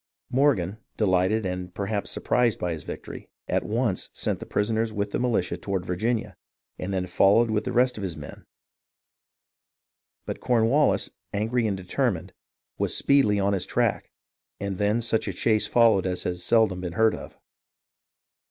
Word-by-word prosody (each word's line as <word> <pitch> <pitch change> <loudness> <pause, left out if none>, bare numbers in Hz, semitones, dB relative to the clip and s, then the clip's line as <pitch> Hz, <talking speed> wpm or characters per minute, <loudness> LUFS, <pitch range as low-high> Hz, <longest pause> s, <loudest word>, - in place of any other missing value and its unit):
Morgan, 115 -8 +2 0.2
delighted 95 +1 +2
and 90 -1 -4
perhaps 100 +1 -2
surprised 120 -3 +1
by 90 - -2
his 80 -2 -4
victory, - - -8 0.2
at - - 0
once 110 -3 -1
sent - - -2
the - - -8
prisoners 110 +2 0
with 105 -1 -2
the - - -1
militia 120 -7 0
toward 95 -3 -3
Virginia, 110 +6 -1 0.4
and 90 - -4
then 95 -1 -1
followed 105 +5 +4
with 105 -1 0
the - - -2
rest 125 0 +2
of - - -5
his 90 -5 -4
men; 75 - -10 1.8
but - - -5
Cornwallis, 125 +5 +2 0.2
angry 115 +3 +1
and 100 -2 -1
determined, 95 -1 -2 0.5
was - - +1
speedily 135 -8 +3
on 100 +1 +2
his 95 -2 -1
track, - - 0 0.5
and 100 -2 -4
then 105 +3 +2
such 115 -1 0
a 100 - -2
chase 110 +3 +1
followed 115 -6 +4
as 90 -1 -2
has 90 0 -3
seldom 110 -4 +3
been 90 -2 -4
heard 110 +3 +3
of. - - -9
105 Hz, 160 wpm, -26 LUFS, 95-115 Hz, 1.8 s, followed